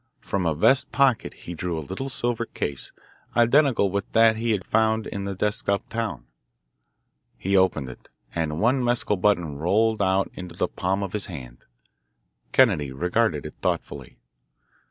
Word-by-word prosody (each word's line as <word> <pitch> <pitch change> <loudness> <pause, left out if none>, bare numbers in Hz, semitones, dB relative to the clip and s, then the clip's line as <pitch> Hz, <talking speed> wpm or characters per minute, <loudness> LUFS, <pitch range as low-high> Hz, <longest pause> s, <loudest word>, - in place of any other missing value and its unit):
From 95 -3 -1
a 80 - +1
vest 130 - +3
pocket 135 -4 +2
he 85 - -9
drew 85 0 -3
a - - -2
little 115 +9 -4
silver 120 -2 -1
case, 70 -2 -5 0.5
identical 120 -4 +4
with 100 0 -3
that 115 0 +5
he 115 +1 -2
had 105 -4 0
found 110 0 +1
in 100 -1 -5
the 100 -1 -4
desk 105 +2 -1
up 100 0 0
town. 115 -2 -3 1.1
He 95 +1 -1
opened 95 -8 +2
it, 65 - -12 0.2
and 80 -2 -2
one 125 +4 +2
mescal 120 -3 +1
button 90 -7 +1
rolled 110 +6 +2
out 95 0 +1
into 90 -2 -9
the - - 0
palm 95 +2 -2
of 95 - -5
his 105 - -1
hand. 65 -9 -10 0.9
Kennedy 70 -3 +3
regarded 85 +4 0
it - - -7
thoughtfully. - - -3
100 Hz, 160 wpm, -24 LUFS, 85-115 Hz, 1.1 s, that